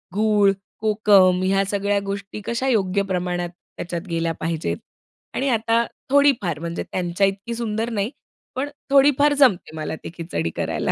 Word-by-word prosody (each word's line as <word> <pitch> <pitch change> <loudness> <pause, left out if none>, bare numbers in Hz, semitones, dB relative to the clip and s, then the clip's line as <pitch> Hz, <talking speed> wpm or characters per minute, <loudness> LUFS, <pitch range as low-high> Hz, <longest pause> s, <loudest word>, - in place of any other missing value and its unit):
गूळ, 210 -1 +4 0.3
कोकम 205 -4 +4
ह्या 195 +1 +2
सगळ्या 200 +1 0
गोष्टी, 200 +1 -5
कशा 235 +3 -1
योग्य 200 -5 +2
प्रमाणात 175 -1 -1 0.3
त्याच्यात 175 +2 -5
गेल्या 165 0 -1
पाहिजेत? 160 - -2 0.6
आणि 275 +1 0
आता 230 0 +2 0.2
थोडीफार, 260 - +3
म्हणजे 170 +1 -4
त्यांच्या 180 +2 +1
इतकी 200 +4 -4
सुंदर 225 0 -2
नाही, 215 0 -1 0.4
पण 270 +3 -2 0.2
थोडीफार 285 +1 +5
जमते 245 - +3
मला 155 0 -4
ते - - -5
खिचडी 160 - -3
करायला. - - -1
200 Hz, 145 wpm, -22 LUFS, 175-230 Hz, 0.6 s, थोडीफार